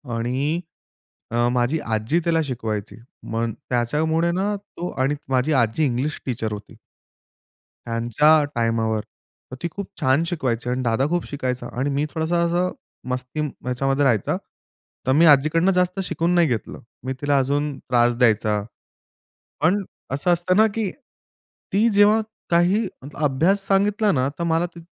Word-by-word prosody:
आणि 135 +8 -1 0.7
अ, 120 +1 +2
माझी 125 +5 +1
आजी 110 +11 +1
त्याला 165 -1 +2
शिकवायची, 110 -5 -4 0.3
मग 115 0 -2 0.2
त्याच्यामुळे 160 +8 +1
ना 200 +3 0
तो 180 -3 -7
आणि 140 +3 +1
माझी 130 +4 +2
आजी 115 +7 +1
इंग्लिश 135 +4 -1
टीचर 115 -4 -2
होती 105 0 -9 1.1
त्यांच्या 120 +7 +3
टायमावर. 115 -2 0 0.5
तर 130 - -7
ती 170 - 0
खूप 200 +3 -6
छान 135 +2 +3
शिकवायची 130 -9 -2
आणि 125 +1 -1
दादा 120 +3 +1
खूप 175 0 -1
शिकायचा 125 -3 -3
आणि 140 +2 0
मी 140 +2 0
थोडासा 165 +1 -1
असा 175 +2 +1 0.4
मस्ती 125 +4 -3
ह्याच्यामध्ये 135 -1 -1
राहायचा. 115 -7 +2 0.8
मी 160 +4 +5
आजीकडनं 155 +6 +5
जास्त 180 +1 +1
शिकून 170 0 0
नाही 170 -2 +5
घेतलं. 115 -3 -3 0.2
मी 130 - -2
तिला 145 -1 +2
अजून 140 +1 0
त्रास 120 -1 +2
द्यायचा. 110 -3 +2 1.0
पण 185 +6 +3 0.3
असं 145 +6 +1
असतं 175 +2 +1
ना 220 +1 +6
की 215 -5 -1 0.8
ती 215 +4 +4
जेव्हा 205 +2 +5 0.3
काही 175 +6 +3 0.2
मतलब 145 +2 -10
अभ्यास 180 +9 +2
सांगितला 205 +2 +2
ना, 130 -2 +1
तर 170 - -1
मला 165 +1 +1
ते 170 0 -13
145 Hz, 145 wpm, -22 LUFS, 125-175 Hz, 1.1 s, ना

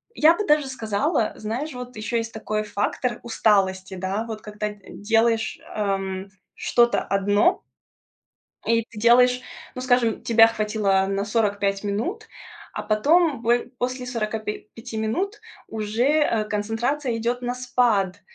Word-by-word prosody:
я 315 +2 +6
бы 420 - -2
даже 300 -2 +3
сказала, 235 - -1
знаешь, 245 +8 -4
вот 250 0 -8
ещё 215 +2 -2
есть 230 0 -3
такой 215 -1 -2
фактор 210 +4 -2
усталости, 195 -4 +1
да, 190 +4 -2
вот 220 -1 -6
когда 210 0 -4 0.2
делаешь, 225 +1 +1 0.2
эм, 195 -2 -2 0.3
что-то 240 0 +3
одно 205 - +2 1.0
и 230 0 +3
ты 215 - -10
делаешь 250 +2 +5 0.3
ну, 255 - -5
скажем, 245 -3 +2
тебя 225 -1 +6
хватило 210 -3 +1
на 195 0 -1
45 205 -2 0
минут, 260 - -3 0.4
а - - -4
потом 290 +5 +2
бой 240 +1 +1
после 255 0 -2
45 220 -1 -5
минут 370 - -2 0.3
уже, 220 +2 -1
э, 290 -6 +2
концентрация 225 +5 -1
идёт 240 +2 -2
на 245 0 -2
спад. 240 -6 +1
225 Hz, 130 wpm, -24 LUFS, 210-250 Hz, 1.0 s, я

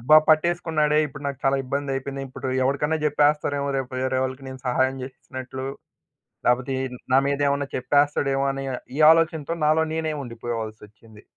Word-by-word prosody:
అబ్బా! 150 +6 +6
పట్టేసుకున్నాడే 155 -2 +2
ఇప్పుడు 140 0 -11
నాకు 140 -2 -3
చాలా 135 0 +3
ఇబ్బందయిపోయింది. 135 0 -3
ఇప్పుడు 130 +1 -6
ఎవరికైనా 140 +4 +1
చెప్పేస్తారేమో 145 -1 +1
రేపు 130 -1 -3
వేరే 130 0 0
వాళ్ళకి 130 +1 -4
నేను 130 0 -9
సహాయం 130 +1 +1
చేసినట్లు, 130 0 -7 0.8
లేకపోతే 125 +2 +2
ఏ - - -2 0.3
నా 130 - +7
మీదేమన్న 140 0 +1
చెప్పేస్తాడేమో 140 +1 +2
అని 135 0 -5 0.3
ఈ - - -3
ఆలోచనతో 165 -1 +1
నాలో 155 +1 +4
నేనే 160 -1 -1
ఉండిపోవాల్సోచ్చింది. 110 -2 -7
135 Hz, 135 wpm, -24 LUFS, 130-150 Hz, 0.8 s, నా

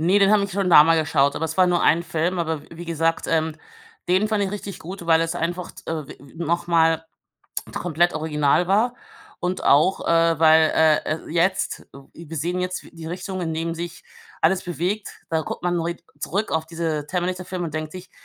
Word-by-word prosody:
Ne, 180 +5 +4
den 195 - +5
habe 210 -2 +4
ich 200 - -6
schon 190 -2 0
da 150 -2 +9
mal 165 0 +4
geschaut, 140 -2 +2
aber 160 - -2
es 160 +1 -4
war 185 -1 +5
nur 175 -1 +2
ein 170 +2 +4
Film. 170 +3 -1
Aber 160 -3 -2
w - - -18
wie 170 +1 -9
gesagt, 165 0 0
ähm, 160 -1 0 0.5
den 190 +4 +3
fand 210 -2 +1
ich 190 - -3
richtig 200 -2 -6
gut, 180 +2 -8
weil 165 -1 +5
es 165 0 -1
einfach 175 +2 -3
t - - -9
äh, 155 -4 -3
w - - -10
w 140 +1 -16
noch 170 +1 -1
mal 165 -1 +3 0.7
komplett 175 0 +1
original 155 +1 +1
war 220 +6 +2 0.5
und 180 +1 -2
auch, 155 +7 +3
äh, 165 -1 +3
weil, 160 0 +6
äh, 155 -1 +5 0.2
äh 155 - -8
jetzt, 175 +4 0
äh 140 - -11
wir 165 -1 -8
sehen 175 +5 -1
jetzt 180 0 -3
die 165 -1 -10
Richtung, 185 +2 -5
in 165 -2 -2
dem 165 +1 -2
sich 170 0 -7 0.4
alles 180 +3 +3
bewegt. 180 +4 -2 0.2
Da 160 -1 +1
guckt - - -6
man, 175 0 +1
neu 170 +1 -2 0.2
zurück 200 +4 -2
auf 160 0 0
diese 160 -3 -3
„Terminator“-Filme 180 0 -3
und 155 - -6
denkt 155 +1 -4
sich: 185 0 -10
170 Hz, 215 wpm, -23 LUFS, 160-180 Hz, 0.7 s, da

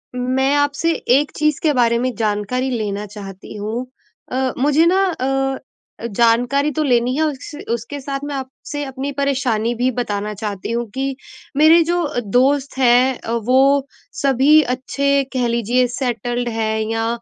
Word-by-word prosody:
मैं 260 +2 +1
आपसे 290 +3 +1 0.3
एक 290 +1 -1
चीज़ 305 -1 +1
के 310 - +3
बारे 235 -2 +3
में 255 0 -1
जानकारी 215 +4 -1
लेना 210 -4 -3
चाहती 195 -1 -10
हूँ। 220 +5 -3 0.5
अ, 260 0 0
मुझे 295 +5 +3
ना 375 +3 +3
अ, 270 -2 -1 0.5
जानकारी 240 +6 +2
तो 310 +1 -1
लेनी 250 -2 +2
है 315 - +1
उस 295 -2 -4 0.2
उसके 235 +5 -3
साथ 275 0 -4
मैं 290 -1 -4
आपसे 270 +2 -6
अपनी 270 +1 -4
परेशानी 255 -5 0
भी 250 +2 +1
बताना 210 -3 -2
चाहती 205 0 -5
हूँ 235 +1 -1
कि, 270 +3 -2 0.4
मेरे 315 +3 +7
जो 345 +2 0 0.3
दोस्त 270 +3 +2
हैं 255 0 +4
अ, - - -6
वो 265 +4 +3 0.3
सभी 280 +3 +5
अच्छे 280 +2 0
कह 250 -2 +1
लीजिए 235 +2 +1
सेटल्ड 245 -1 -2
हैं 220 -1 -1
या 225 0 -1
255 Hz, 155 wpm, -19 LUFS, 235-280 Hz, 0.5 s, मेरे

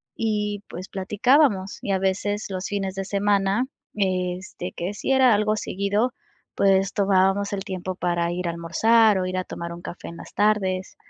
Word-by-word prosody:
Y 210 -2 -1
pues, 185 +2 -7
platicábamos 205 +1 +2
y 200 - -2
a 190 - +2
veces, 200 +2 -1
los 185 0 -4
fines 195 -2 -3
de 195 - -2
semana, 200 +3 +1 0.3
este, 185 -2 -2
que 180 +4 -4
si 210 - -3
era 260 -3 +5
algo 215 +1 +1
seguido, 205 +5 0 0.4
pues, 195 0 +3
tomábamos 195 +1 +2
el 195 0 -3
tiempo 185 -2 -4
para 175 -1 0
ir 180 0 -3
a - - 0
almorzar, 210 +6 +3
o 185 - -1
ir 185 0 -3
a 185 - 0
tomar 170 0 -6
un 170 - -9
café 175 - -8
en 170 - -10
las - - -11
tardes. 190 -3 +1
195 Hz, 180 wpm, -24 LUFS, 185-210 Hz, 0.4 s, era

